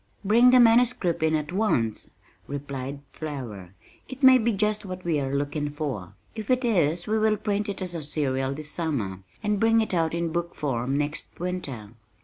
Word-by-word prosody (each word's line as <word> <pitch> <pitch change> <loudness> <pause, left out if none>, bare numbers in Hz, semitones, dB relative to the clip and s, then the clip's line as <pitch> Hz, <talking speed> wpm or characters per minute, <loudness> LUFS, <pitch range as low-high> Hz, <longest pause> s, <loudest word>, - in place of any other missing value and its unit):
"Bring 235 +5 +6
the 255 0 +7
manuscript 230 -7 +4
in 160 0 +3
at 150 0 -2
once," 120 - 0 0.4
replied 140 -1 -5
Flower. 115 - -7 0.3
"It 260 +2 -9
may 260 -1 +8
be 230 0 +2
just 210 +1 0
what 185 -2 -7
we 160 -4 +1
are 135 0 -2
looking 145 +1 -1
for. 130 - -5 0.2
If 220 -2 -7
it 255 0 +2
is 175 -6 +2
we 220 +1 +1
will 215 0 +3
print 205 0 -1
it 195 -1 -3
as 180 -1 -4
a 165 - -4
serial 135 -2 -1
this 155 +1 -5
summer, 130 - -2 0.2
and 210 -1 +1
bring 225 +1 +4
it 220 -3 -1
out 165 -2 +1
in 170 -1 -1
book 170 +1 -3
form 135 -1 -1
next 150 +1 -2
winter." 145 - -4
165 Hz, 185 wpm, -26 LUFS, 140-210 Hz, 0.4 s, may